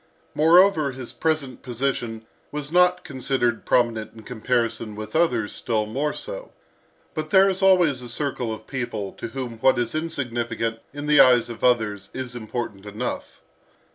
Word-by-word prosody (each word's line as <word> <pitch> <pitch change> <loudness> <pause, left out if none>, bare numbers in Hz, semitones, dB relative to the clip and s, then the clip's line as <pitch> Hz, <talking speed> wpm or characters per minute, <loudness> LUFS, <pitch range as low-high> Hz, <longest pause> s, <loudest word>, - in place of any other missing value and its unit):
Moreover, 160 -1 +5
his 130 -2 -7
present 155 -6 -1
position 120 -3 -3 0.3
was 150 0 -5
not 180 +1 +4
considered 130 -3 -1
prominent 115 -3 +1
in 110 - -12
comparison 115 -2 -1
with 110 0 -7
others 125 -11 +1
still 110 -2 -1
more 140 +8 -1
so. - - -7 0.6
But 155 0 -4
there 190 +3 +6
is 190 0 0
always 180 -9 +4
a 120 - -8
circle 125 -2 -2
of 110 0 -7
people 120 -7 -4
to - - -6
whom 120 -1 -6
what 130 +2 +4
is 120 -1 -1
insignificant 120 -7 -2
in 145 +1 -6
the 150 0 +4
eyes 120 -2 +6
of 115 - -10
others, 110 -5 +1
is 130 -2 -5
important 110 -3 -5
enough. 110 +5 -5
125 Hz, 155 wpm, -24 LUFS, 115-150 Hz, 0.6 s, there